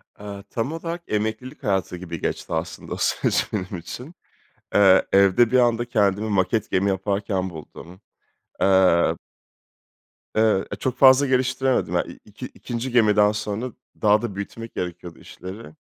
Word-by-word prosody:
Aaa 100 -1 -8
tam 115 +5 -2
olarak 165 +1 -5
emeklilik 110 +6 -3
hayatı 95 -3 -1
gibi 85 -2 -7
geçti - - -3
aslında 80 +1 -4
o - - -5
süreç - - 0
benim 95 -2 -3
için. 120 - -9 0.6
Eee, 95 -2 +6
evde 100 +4 +4
bir 130 - +4
anda 120 -1 +2
kendimi 105 -2 +1
maket 100 +2 0
gemi 100 +2 +2
yaparken 95 -1 -1
buldum, 85 +3 -12 0.6
eee 95 -3 +4 1.2
Eee, 110 -3 +3
e - - -2
çok 130 - -3
fazla 135 +1 +7
geliştiremedim 130 0 +1
hani. - - -1
İ - - -18
iki - - -9
ikinci 120 +2 -6
gemiden 105 -3 +4
sonra 105 +4 -4 0.3
daha 105 0 +4
da 115 -5 -4
büyütmek 115 +3 -7
gerekiyordu 90 -1 -6
işleri 95 -3 -10
105 Hz, 145 wpm, -23 LUFS, 95-120 Hz, 1.2 s, fazla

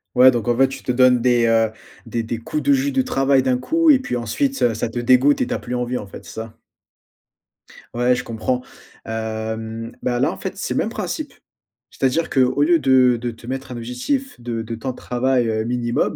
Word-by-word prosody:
Ouais, 130 +1 +8
donc, 120 -2 -1
en 120 - +2
fait, 135 0 +5
tu 135 - -9
te - - -1
donnes 125 -1 +4
des, 120 -1 +3
heu, 115 -1 +3 0.3
des 115 - -2
des 115 +1 -4
coups 150 +6 -3
de 140 +1 +4
jus 135 +1 +1
de 130 -1 +2
travail 135 0 +2
d'un 130 -1 +2
coup 330 - +2
et 285 - +8
puis 125 - -3
ensuite, 265 - -1
heu, 120 -2 +3
ça 110 - -2
te 120 +1 -4
dégoûte 130 +4 +4
et - - 0
tu - - -2
as - - -2
plus 125 - -6
envie, 125 0 -2
en 105 - -6
fait, 95 - -12
c'est - - -10
ça? 110 0 -8 1.4
Ouais, 120 +1 +2
je 125 - -4
comprends. 120 +2 -2 0.4
Hem, 110 +1 -4
ben 120 -1 -1
là, - - +2
en - - -8
fait, - - -5
c'est - - -3
le - - -2
même - - 0
principe, - - -4 0.6
c'est-à-dire 135 +5 0
qu'au 130 +1 +2
lieu 165 +1 +4
de 130 -3 +4
de 120 +1 -3
te 115 +1 -14
mettre 135 0 -5
un - - -6
objectif 125 - -3
de 120 -1 -4
de 115 +1 -5
temps 130 +3 -4
de 125 - -12
travail, 125 -1 0
heu, 110 0 -1
minimum, 120 0 -1
125 Hz, 230 wpm, -21 LUFS, 115-130 Hz, 1.4 s, Ouais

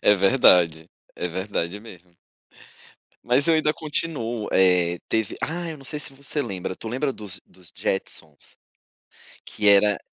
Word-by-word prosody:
É 105 - +6
verdade, 90 -6 +4 0.3
é 90 - -3
verdade 95 +1 -3
mesmo. 90 -5 -15 1.1
Mas 130 +6 +2
eu 165 - +5
ainda 155 -1 +2
continuo, 140 -8 -3
eh, 90 -2 +3
teve 110 -2 0
ah, 170 +1 -3
eu 155 - -8
não 135 - -14
sei 150 +2 -3
se 145 -1 -4
você 140 +2 -1
lembra, 95 -3 -5
tu 115 - -7
lembra 135 +4 -1
dos 95 -4 -8
dos 90 -4 -19
Jetsons? 75 -3 -5 0.9
Que 105 -1 0
era 100 +1 +5
105 Hz, 150 wpm, -24 LUFS, 90-140 Hz, 1.1 s, É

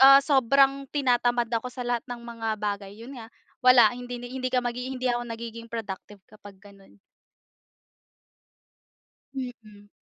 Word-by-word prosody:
ah 275 +1 +10
sobrang 275 0 +3
tinatamad 245 -4 +2
ako 230 +2 -1
sa 250 +1 -6
lahat 240 -1 -1
ng 245 -1 -6
mga 230 -1 -5
bagay. 200 -1 -3
Yun 240 +5 -10
nga, 225 - -9 0.4
wala, 250 -4 +7
hindi 245 0 -6
hindi 255 +1 -4
ka 250 - +3
hindi 250 +1 -3
ako 240 0 -1
nagiging 230 0 -7
productive 205 -3 -7
kapag 205 -2 -14
gano'n. 200 -1 -18 2.4
Mm. 225 -6 -8
240 Hz, 130 wpm, -26 LUFS, 225-255 Hz, 2.4 s, ah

